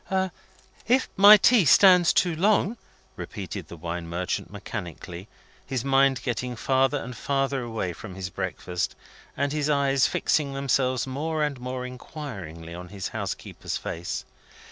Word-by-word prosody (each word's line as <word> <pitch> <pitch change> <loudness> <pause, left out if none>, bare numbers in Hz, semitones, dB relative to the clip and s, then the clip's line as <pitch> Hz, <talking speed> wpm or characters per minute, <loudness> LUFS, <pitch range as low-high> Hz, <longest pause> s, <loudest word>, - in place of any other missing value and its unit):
"If 255 +3 +3
my 205 +2 +10
tea 225 +1 +5
stands 180 +2 +7
too 175 -3 +2
long," 205 +5 +2 0.4
repeated - - -6
the 85 - -10
wine 85 +1 -5
merchant 90 +2 -3
mechanically, 95 -3 -7 0.4
his 130 -2 -3
mind 135 -2 +3
getting 125 0 -2
farther 135 +4 +2
and 125 -2 -6
farther 135 +2 -1
away 110 -7 -3
from 95 +3 -9
his 95 -1 -5
breakfast, 90 -1 -3 0.4
and 140 0 0
his 150 -1 0
eyes 140 -2 +3
fixing 140 -3 0
themselves 130 -2 +1
more 150 +4 -2
and 145 -3 -2
more 125 0 -4
inquiringly 100 - -8
on 90 +1 -8
his 95 +1 -5
housekeeper's - - -5
face. 85 +1 -5
130 Hz, 140 wpm, -26 LUFS, 95-145 Hz, 0.4 s, my